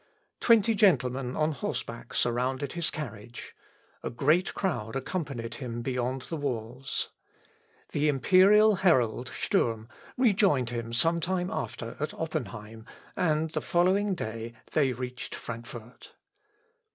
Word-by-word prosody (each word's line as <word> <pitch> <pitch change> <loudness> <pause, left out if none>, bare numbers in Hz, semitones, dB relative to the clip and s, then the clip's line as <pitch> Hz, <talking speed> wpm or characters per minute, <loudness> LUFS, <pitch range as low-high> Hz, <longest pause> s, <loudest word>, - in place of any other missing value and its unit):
Twenty 230 -1 +5
gentlemen 135 - +2
on 155 +1 +2
horseback 120 -4 -5
surrounded 130 +3 0
his 170 -1 -1
carriage. 120 -5 -7 0.5
A - - -3
great 155 +9 +2
crowd 120 - -2
accompanied 135 -5 -3
him 120 -3 -5
beyond 125 +1 -2
the 165 - -5
walls. 130 -2 -3 0.8
The 150 +1 +1
imperial 190 - +5
herald, 130 - +2
Sturm, 115 -1 0 0.3
rejoined 195 - +3
him 115 -1 -4
some 165 +8 +2
time 180 +2 -1
after 115 - -4
at 150 +1 -3
Oppenheim, 110 -8 -5 0.3
and 160 -2 +1
the 155 - -2
following 190 +3 +2
day 115 -5 -5 0.2
they 140 -4 +3
reached 125 0 -5
Frankfort. 120 0 -9
135 Hz, 115 wpm, -28 LUFS, 120-170 Hz, 0.8 s, Twenty